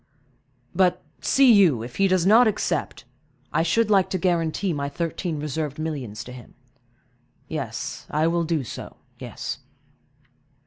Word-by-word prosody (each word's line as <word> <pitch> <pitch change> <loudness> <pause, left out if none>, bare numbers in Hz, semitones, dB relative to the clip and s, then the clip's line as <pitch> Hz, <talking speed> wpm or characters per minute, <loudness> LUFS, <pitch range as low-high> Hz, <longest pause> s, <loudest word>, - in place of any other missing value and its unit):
"But, 180 0 +2 0.2
see 265 -3 +5
you, 170 - +4
if 120 +1 -9
he 195 - +4
does 185 -2 +2
not 225 +5 +6
accept, 215 - -2 0.5
I - - +3
should 215 +7 +2
like 195 -3 +4
to 185 - -1
guarantee 175 0 0
my 140 -1 -2
thirteen 165 +1 -3
reserved 150 -1 -3
millions 135 -9 -4
to 125 - -10
him—yes, 125 +1 -9
I 155 +1 +1
will 170 +1 +1
do 160 -3 -1
so—yes. 120 - -8
160 Hz, 130 wpm, -24 LUFS, 130-185 Hz, 0.5 s, not